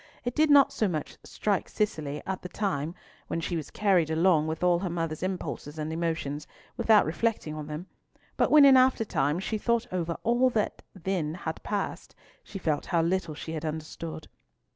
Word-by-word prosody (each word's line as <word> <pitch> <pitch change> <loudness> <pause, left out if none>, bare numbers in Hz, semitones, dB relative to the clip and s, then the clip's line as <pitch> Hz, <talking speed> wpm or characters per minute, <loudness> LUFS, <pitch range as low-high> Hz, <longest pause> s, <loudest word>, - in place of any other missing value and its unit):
It 245 - -1
did 310 +2 +3
not 285 -2 +6
so 215 - +1
much 155 -5 -4
strike 205 -3 -1
Cicely 150 -9 -2
at 190 -1 -3
the 180 - -7
time, 170 -6 -2 0.3
when - - -2
she 170 +1 -2
was 155 -4 -4
carried 185 -6 +2
along 160 -1 +3
with 160 +2 -3
all 175 -1 +4
her 185 0 -2
mother's 165 -2 -3
impulses 180 -5 -4
and 155 +1 -3
emotions, 160 -3 -2 0.3
without 220 -2 +5
reflecting 170 -1 -1
on 155 -1 -6
them, 155 +3 -5 0.5
but - - +2
when 300 -2 +8
in 270 -1 +8
after 255 -3 +4
times 150 0 0
she 215 +1 -2
thought 235 +1 +1
over 170 -2 -2
all 240 +3 +3
that 220 -4 -1
then 175 -4 -2
had 160 -2 -5
passed, 205 -2 -4 0.3
she 200 - -8
felt 155 -6 -1
how 170 -3 +2
little 170 -2 -1
she 160 - -7
had 160 -1 -4
understood. 160 +1 -5
170 Hz, 185 wpm, -28 LUFS, 155-205 Hz, 0.5 s, when